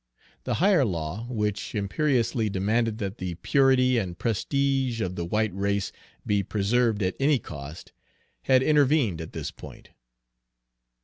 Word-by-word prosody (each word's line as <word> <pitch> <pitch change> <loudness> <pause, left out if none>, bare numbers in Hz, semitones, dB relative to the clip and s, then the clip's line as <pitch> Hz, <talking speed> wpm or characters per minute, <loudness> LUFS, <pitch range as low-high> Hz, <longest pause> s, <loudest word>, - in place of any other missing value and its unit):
The - - 0
higher 185 -4 +4
law, 90 +2 -3
which 105 -4 -2
imperiously 115 0 0
demanded 110 +3 0
that 100 0 -5
the 90 -2 -4
purity 130 - +3
and 90 -4 -4
prestige 135 +2 0
of 90 -4 -2
the 85 - -3
white 105 +4 0
race 100 +1 -1 0.3
be 100 -1 +1
preserved 110 +2 +1
at 95 - -1
any 140 +1 +3
cost, 75 - -9 0.5
had 130 0 +4
intervened 140 - +3
at 80 - -8
this - - -4
point. - - -13
110 Hz, 135 wpm, -26 LUFS, 95-130 Hz, 0.5 s, higher